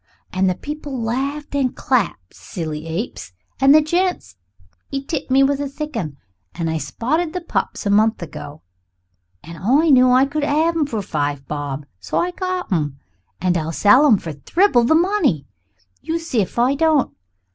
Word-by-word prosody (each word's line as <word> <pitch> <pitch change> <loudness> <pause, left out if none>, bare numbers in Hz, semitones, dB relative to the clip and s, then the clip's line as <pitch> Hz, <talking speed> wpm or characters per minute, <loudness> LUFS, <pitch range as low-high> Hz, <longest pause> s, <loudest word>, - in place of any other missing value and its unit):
And 185 0 +2
the 180 - 0
people 290 +1 -6
laughed 270 +7 -3
and 270 -3 0
clapped 195 - -1
silly 155 -2 -6
apes! 165 - -5 0.3
And 270 +1 +5
the 310 - +6
gent 355 - -1 0.6
'e 275 0 -4
tipped 320 - -4
me 270 +1 +5
a 280 +1 +1
thick 300 +1 -6
'un, 155 -10 -4 0.4
and 165 -1 -2
I 160 - -1
spotted 310 - -2
the 360 - -3
pups 335 - -3
a 200 - +1
month 220 +2 +3
ago, 150 -2 -9 0.8
and 165 +1 -10
I 280 - +3
knew 255 -1 +6
I 255 +2 +5
could 295 +2 -3
have 315 +4 +2
'em 310 -3 +1
for 220 -7 -3
five 145 -5 -3
bob, 145 -1 -4
so 95 - -3
I 355 - +1
got 370 - -3
'em. 150 -6 -1 0.4
And 180 -1 +1
I'll 160 -1 -1
sell 210 - +5
em 220 - +6
for 165 -4 -6
thribble 240 - +2
the 315 - +4
money, 330 - +2 0.6
you 325 - -2
see 325 -9 -1
if 190 - -5
I 245 +3 +3
don't. 310 -1 +2
255 Hz, 180 wpm, -20 LUFS, -, 0.8 s, the